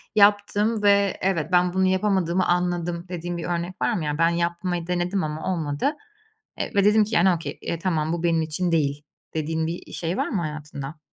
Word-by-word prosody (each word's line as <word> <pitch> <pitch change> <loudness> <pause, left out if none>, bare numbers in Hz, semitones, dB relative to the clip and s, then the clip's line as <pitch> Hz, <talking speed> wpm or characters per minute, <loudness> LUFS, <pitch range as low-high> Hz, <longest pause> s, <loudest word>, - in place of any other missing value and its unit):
yaptım 205 +1 +3
ve 200 -1 +4
evet, 170 -5 0
ben 180 0 +3
bunu 190 0 +2
yapamadığımı 185 -2 +1
anladım 175 -1 0
dediğin 175 -1 -4
bir 170 - -5
örnek 175 +1 -3
var - - +2
mı? 185 -7 -2
Yani, 150 0 -1
ben 165 0 +4
yapmayı 170 0 -1
denedim 180 +2 0
ama 155 +4 -2
olmadı, 160 - -1 0.6
eee, - - -2
ve 200 -1 +4
dedim 210 +1 +5
ki, 220 +2 -3
yani, 175 +3 +5
okay, 170 -1 -4
tamam, 160 -3 0
bu 170 0 -3
benim 165 -1 +2
için 160 +3 -1
değil, 145 -3 0 0.3
dediğin 160 +1 -1
bir, 170 +2 -4
eee, - - -12
şey 170 +2 -2
var - - 0
mı 190 - -1
hayatında? 150 -1 -6
175 Hz, 195 wpm, -24 LUFS, 160-190 Hz, 0.6 s, dedim